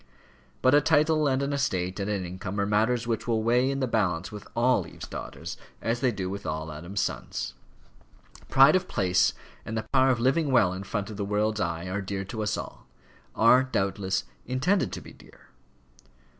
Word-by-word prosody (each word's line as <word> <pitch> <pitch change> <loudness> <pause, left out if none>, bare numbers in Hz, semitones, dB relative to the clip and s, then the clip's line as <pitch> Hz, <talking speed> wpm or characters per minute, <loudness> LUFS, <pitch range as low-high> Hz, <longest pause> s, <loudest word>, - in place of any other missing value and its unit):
But 130 - +5
a 145 - +6
title, 155 0 +3
and 135 0 +1
an 140 +1 -1
estate, 95 -9 -1
and 100 +1 -2
an 100 -3 -1
income, 95 +3 -5
are 100 - +2
matters 110 +4 +1
which 115 -1 -2
will 110 -2 +1
weigh 125 +3 +3
in 135 0 -2
the 130 - +1
balance 95 -7 0
with 105 -1 -9
all 120 -7 +2
Eve's - - -9
daughters - - -7 0.2
as 115 +1 -1
they 125 0 +2
do 95 -4 -4
with 100 +2 -5
all 80 +1 -4
Adam's 85 +7 -4
sons. 65 +1 -3 1.0
Pride 135 +4 +7
of 185 0 +1
place, 90 -1 +2 0.3
and 115 0 -4
the 110 - -3
power 130 0 +5
of 125 -2 +2
living 135 +4 +2
well 110 -8 +4
in 95 - -5
front 100 +1 -4
of 105 - -8
the 100 - -2
world's 105 +1 0
eye, 85 0 -2
are 95 +2 -2
dear 95 0 -4
to 110 +3 -5
us 105 0 -1
all; - - -8 0.5
are, 120 +3 +6
doubtless, 95 -6 -1 0.2
intended 135 - +1
to - - -5
be - - -12
dear. - - -19
110 Hz, 200 wpm, -27 LUFS, 95-130 Hz, 1.0 s, Pride